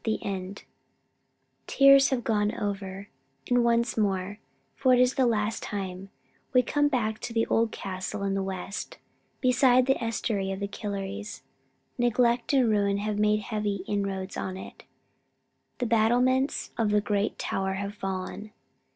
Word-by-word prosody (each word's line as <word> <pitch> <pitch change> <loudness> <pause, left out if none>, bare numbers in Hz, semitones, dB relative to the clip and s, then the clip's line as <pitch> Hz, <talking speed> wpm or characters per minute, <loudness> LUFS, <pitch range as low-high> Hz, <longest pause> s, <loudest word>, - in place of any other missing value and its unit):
THE 220 -1 0
END 195 0 -5 1.0
Tears 275 0 +6
have 255 -3 -1
gone 210 -2 0
over, 200 -1 -4 0.4
and 245 -1 +3
once 235 0 +2
more 200 -1 -1 0.4
it 255 -2 +5
is 250 +1 +4
for - - -20
the 255 - +4
last 220 -1 0
time 195 -2 -5 0.4
we 250 -1 +5
come 290 +4 +2
back 220 -6 -1
to 230 - -6
the 225 0 +2
old 225 0 +1
castle 195 +2 -5
in 195 0 0
the 195 - 0
West, 190 +1 -5 0.4
beside 255 0 +4
the 270 -2 +1
estuary 215 -4 -1
of 190 - -4
the 200 - -2
Killeries. 205 0 -5 0.6
Neglect 240 +1 +2
and 265 -4 +4
ruin 200 -2 +2
have 210 0 -2
made 210 0 +3
heavy 210 -3 -3
inroads 195 -2 -3
on 185 0 -4
it. - - -11 0.9
The 245 - -1
battlements 245 +4 +2
of 220 -2 +2
the 210 0 +3
great 205 0 -1
tower 190 0 -2
have 200 +1 -4
fallen. 195 +1 -5
210 Hz, 150 wpm, -27 LUFS, 195-240 Hz, 1.0 s, Tears